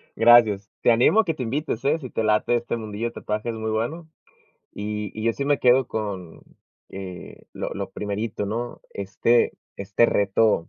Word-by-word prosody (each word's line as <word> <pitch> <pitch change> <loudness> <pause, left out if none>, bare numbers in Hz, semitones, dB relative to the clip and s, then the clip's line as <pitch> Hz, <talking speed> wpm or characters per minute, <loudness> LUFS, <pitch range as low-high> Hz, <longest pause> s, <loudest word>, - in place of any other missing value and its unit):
Gracias. 110 -4 +5
Te - - +5
animo 125 - +5
a - - -7
que 165 - 0
te 135 -5 -5
invites, 130 0 -3
¿eh? 155 +3 +2
Si 130 -4 -8
te 115 - -2
late 110 +2 +2
este 120 0 -3
mundillo 110 0 -4
de - - -7
tatuajes 105 +2 -3
es 110 - -7
muy 110 0 -2
bueno, 155 +10 -3 0.6
y 105 0 -4
y 110 - -3
yo 115 - +3
sí 140 - -4
me 145 -1 +2
quedo 125 +1 +4
con, 100 -7 -5 0.5
eh, 95 -2 -9
lo - - -4
lo - - -5
primerito, 105 0 -3
¿no? 120 +3 -4
Este 100 +4 +1 0.2
este 100 +4 +2
reto 100 -2 +2
110 Hz, 185 wpm, -24 LUFS, 105-120 Hz, 0.6 s, Gracias